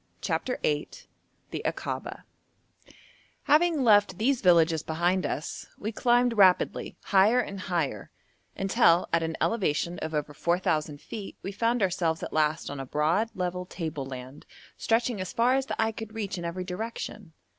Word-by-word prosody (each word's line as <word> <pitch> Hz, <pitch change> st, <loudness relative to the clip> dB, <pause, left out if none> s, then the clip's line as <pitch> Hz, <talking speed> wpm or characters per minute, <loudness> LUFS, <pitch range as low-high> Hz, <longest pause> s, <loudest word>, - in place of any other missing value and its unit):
CHAPTER 250 Hz, -, -2 dB
VIII 150 Hz, 0 st, 0 dB, 0.6 s
THE -, -, -3 dB
AKABA -, -, -4 dB, 1.2 s
Having 310 Hz, -1 st, +3 dB
left 205 Hz, -5 st, +4 dB
these 250 Hz, +4 st, +1 dB
villages 165 Hz, -3 st, +4 dB
behind 175 Hz, +4 st, 0 dB
us, 150 Hz, -, -5 dB
we 215 Hz, -, -4 dB
climbed 240 Hz, +2 st, +3 dB
rapidly 185 Hz, -2 st, +3 dB
higher 200 Hz, +6 st, +4 dB
and 200 Hz, -5 st, -3 dB
higher, 165 Hz, -, -2 dB, 0.5 s
until 180 Hz, -3 st, +3 dB
at 165 Hz, -, +3 dB
an 160 Hz, 0 st, -3 dB
elevation 175 Hz, -5 st, 0 dB
of 160 Hz, -, -4 dB
over 150 Hz, 0 st, -2 dB
4,000 155 Hz, -3 st, 0 dB
feet 205 Hz, +3 st, -8 dB
we 195 Hz, -, -4 dB
found 230 Hz, +2 st, +1 dB
ourselves 170 Hz, -3 st, 0 dB
at -, -, -5 dB
last 155 Hz, -1 st, +1 dB
on 145 Hz, -, -6 dB
a 135 Hz, -, -4 dB
broad, 165 Hz, -, +1 dB
level 180 Hz, 0 st, -3 dB
table 160 Hz, -7 st, -5 dB
land, 130 Hz, +1 st, -9 dB, 0.3 s
stretching 230 Hz, -2 st, 0 dB
as 185 Hz, -, -5 dB
far 245 Hz, +1 st, +3 dB
as 270 Hz, 0 st, 0 dB
the -, -, -4 dB
eye 225 Hz, 0 st, +2 dB
could 220 Hz, 0 st, -8 dB
reach 200 Hz, -3 st, -3 dB
in 175 Hz, -2 st, -5 dB
every 175 Hz, +2 st, -3 dB
direction. 190 Hz, -1 st, -6 dB
185 Hz, 155 wpm, -27 LUFS, 160-225 Hz, 1.2 s, left